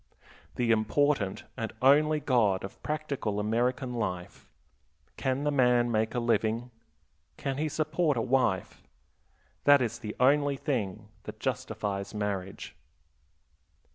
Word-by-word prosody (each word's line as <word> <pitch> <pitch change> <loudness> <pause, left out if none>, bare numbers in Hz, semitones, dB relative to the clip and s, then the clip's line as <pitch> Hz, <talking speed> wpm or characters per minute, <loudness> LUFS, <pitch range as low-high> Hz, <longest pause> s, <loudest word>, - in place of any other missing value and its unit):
The 120 -2 +1
important 115 -1 +1
and 110 -1 -4
only 150 +4 +4
God 115 -9 +2
of 95 - -9
practical 140 -9 -2
American 125 +4 0
life: 90 -7 -4 0.7
Can 135 +1 -1
the 150 - +1
man 125 -3 +3
make 110 +1 0
a - - +1
living? 115 0 0 0.7
can 135 -1 -3
he 155 0 0
support 155 -1 0
a - - +1
wife? 125 -8 0 0.8
That 145 0 +7
is 120 -2 -2
the 105 -3 -6
only 140 +2 +3
thing 110 -7 -3 0.2
that - - -8
justifies 100 0 -3
marriage. 100 -2 -4
120 Hz, 120 wpm, -29 LUFS, 105-140 Hz, 0.8 s, That